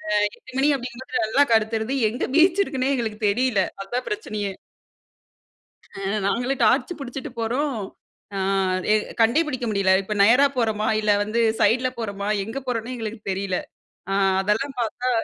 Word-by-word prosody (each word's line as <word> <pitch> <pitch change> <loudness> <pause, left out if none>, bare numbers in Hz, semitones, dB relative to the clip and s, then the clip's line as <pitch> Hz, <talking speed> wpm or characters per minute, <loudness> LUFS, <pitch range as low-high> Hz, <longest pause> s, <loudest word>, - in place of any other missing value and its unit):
ஆ - - -2 0.2
8 - - -15
மணி 280 +2 +3
அப்படிங்கும் 250 0 -8
போது - - -2
நல்லா 275 +6 +3
கருத்துருது 220 +2 +1 0.2
எங்கே 245 - -2
பீச் 350 +4 +5
இருக்குன்னே 265 -3 -1
எங்களுக்கு 220 -3 -3
தெரியல்ல. 225 -2 +2 0.2
அதுதான் 240 +6 -4
பிரச்சனையே. 215 - -3 1.4
அ - - -12 0.3
நாங்களும் 245 +6 -1
டார்ச் 250 +9 +3
புடிச்சிட்டு 265 -1 -6
போறோம், 255 +4 -1 0.6
ஆ - - -1 0.5
எ - - +6 0.3
கண்டே 235 +8 +4
புடிக்க 255 -4 -3
முடியல 195 -2 +2
இப்ப 210 +2 -4
நேரா 250 +7 +6
போறோமா? 220 -3 0
இல்ல 210 -1 +3
வந்து 225 +3 -1 0.2
சைடுல 245 +5 +3
போறோமா? 200 -2 -4 0.2
எங்க 225 +6 -5
போறோம்ன்னே 245 0 -3
எங்களுக்கு 225 -1 -5
தெரியல. 190 -1 -2 0.5
அ - - +1 0.3
அதெல்லாம் 230 +7 -1
பார்த்தா 245 +3 -2
230 Hz, 150 wpm, -23 LUFS, 210-260 Hz, 1.4 s, எ